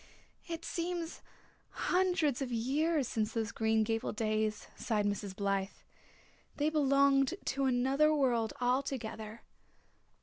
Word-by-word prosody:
"It 330 Hz, -1 st, -5 dB
seems 340 Hz, -1 st, -3 dB, 0.5 s
hundreds 350 Hz, -7 st, +1 dB
of 260 Hz, -2 st, -3 dB
years 275 Hz, +5 st, +1 dB
since 220 Hz, -2 st, -1 dB
those 225 Hz, -1 st, -1 dB
Green 220 Hz, 0 st, +2 dB
Gables 225 Hz, 0 st, -2 dB
days," 215 Hz, -1 st, -1 dB
sighed 210 Hz, -3 st, -1 dB
Mrs. 205 Hz, -1 st, -2 dB
Blythe. 195 Hz, -1 st, 0 dB, 0.9 s
"They 300 Hz, +1 st, +1 dB
belonged 275 Hz, 0 st, +3 dB
to 275 Hz, 0 st, 0 dB
another 265 Hz, +4 st, +3 dB
world 245 Hz, -7 st, +2 dB
altogether. 245 Hz, -4 st, -2 dB
255 Hz, 110 wpm, -33 LUFS, 220-295 Hz, 0.9 s, belonged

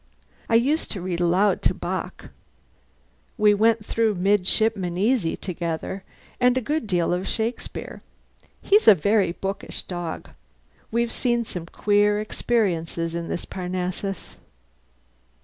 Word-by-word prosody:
I 230 Hz, -, +3 dB
used 280 Hz, +8 st, +2 dB
to 195 Hz, -, -5 dB
read 175 Hz, -1 st, -3 dB
aloud 185 Hz, +3 st, +3 dB
to -, -, +2 dB
Bock: -, -, -5 dB, 1.1 s
we 210 Hz, -1 st, +5 dB
went 220 Hz, +1 st, +2 dB
through 225 Hz, -2 st, +1 dB
'Midshipman 190 Hz, -1 st, +1 dB
Easy' 210 Hz, -3 st, +1 dB
together, 175 Hz, +1 st, -4 dB, 0.4 s
and 250 Hz, 0 st, +4 dB
a -, -, +4 dB
good 295 Hz, +1 st, -2 dB
deal 175 Hz, -3 st, +1 dB
of 180 Hz, +2 st, -2 dB
Shakespeare. 230 Hz, +2 st, -4 dB, 0.6 s
He's 415 Hz, +2 st, +4 dB
a 215 Hz, -, +10 dB
very 200 Hz, +2 st, +2 dB
bookish 195 Hz, +2 st, -5 dB
dog. 175 Hz, -3 st, -6 dB, 0.6 s
We've 235 Hz, +1 st, 0 dB
seen 240 Hz, -2 st, 0 dB
some 175 Hz, -5 st, -6 dB
queer 205 Hz, +2 st, +2 dB
experiences 175 Hz, -7 st, -1 dB
in 170 Hz, 0 st, -3 dB
this -, -, -4 dB
Parnassus." 185 Hz, +1 st, -4 dB
200 Hz, 125 wpm, -24 LUFS, 180-225 Hz, 1.1 s, a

